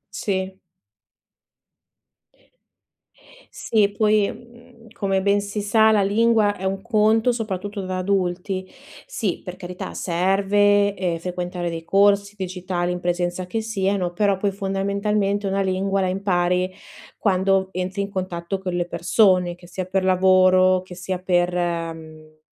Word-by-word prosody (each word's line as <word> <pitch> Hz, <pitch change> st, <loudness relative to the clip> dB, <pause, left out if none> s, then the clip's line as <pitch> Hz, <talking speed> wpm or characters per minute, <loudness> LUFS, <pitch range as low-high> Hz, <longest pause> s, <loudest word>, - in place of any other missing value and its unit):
Sì. 190 Hz, -2 st, -2 dB, 3.0 s
Sì. 210 Hz, -3 st, +1 dB
Poi, 210 Hz, -2 st, +3 dB
mhmm, 240 Hz, 0 st, -14 dB, 0.2 s
come 195 Hz, -3 st, -1 dB
ben 200 Hz, +1 st, +2 dB
si 205 Hz, +1 st, -4 dB
sa 220 Hz, +2 st, +4 dB
la 210 Hz, -2 st, +3 dB
lingua 215 Hz, 0 st, +3 dB
è 185 Hz, -, -11 dB
un 195 Hz, 0 st, -1 dB
conto, 225 Hz, +1 st, +3 dB
soprattutto 205 Hz, -3 st, -4 dB
da 185 Hz, 0 st, -3 dB
adulti. 185 Hz, 0 st, -2 dB, 0.4 s
Sì, 225 Hz, -, -3 dB
per 180 Hz, 0 st, -8 dB
carità, 180 Hz, -1 st, -7 dB
serve, 200 Hz, +3 st, +2 dB
ehm, 180 Hz, -4 st, -2 dB
frequentare 180 Hz, 0 st, -4 dB
dei 165 Hz, -1 st, -5 dB
corsi 200 Hz, +2 st, +3 dB
digitali, 180 Hz, -1 st, -3 dB
in 180 Hz, -, -4 dB
presenza 175 Hz, +1 st, -2 dB
che 225 Hz, +5 st, -2 dB
siano, 195 Hz, -4 st, -1 dB
però 200 Hz, 0 st, +1 dB
poi 200 Hz, +1 st, -1 dB
fondamentalmente 200 Hz, +1 st, -1 dB
una 195 Hz, 0 st, 0 dB
lingua 195 Hz, +1 st, 0 dB
la 185 Hz, -, +1 dB
impari 185 Hz, -1 st, 0 dB, 0.5 s
quando 190 Hz, -1 st, +1 dB
entri 185 Hz, +2 st, -3 dB
in 200 Hz, -, -5 dB
contatto 185 Hz, 0 st, -4 dB
con 185 Hz, -1 st, -4 dB
le 175 Hz, 0 st, -1 dB
persone, 180 Hz, -3 st, +2 dB
che 175 Hz, -, -16 dB
sia 185 Hz, +1 st, -5 dB
per 185 Hz, +1 st, -1 dB
lavoro, 185 Hz, 0 st, +4 dB
che 185 Hz, -1 st, -11 dB
sia 180 Hz, +1 st, -4 dB
per, 180 Hz, -1 st, +1 dB
mhmm, 165 Hz, -3 st, -4 dB
190 Hz, 135 wpm, -22 LUFS, 180-200 Hz, 3.0 s, sa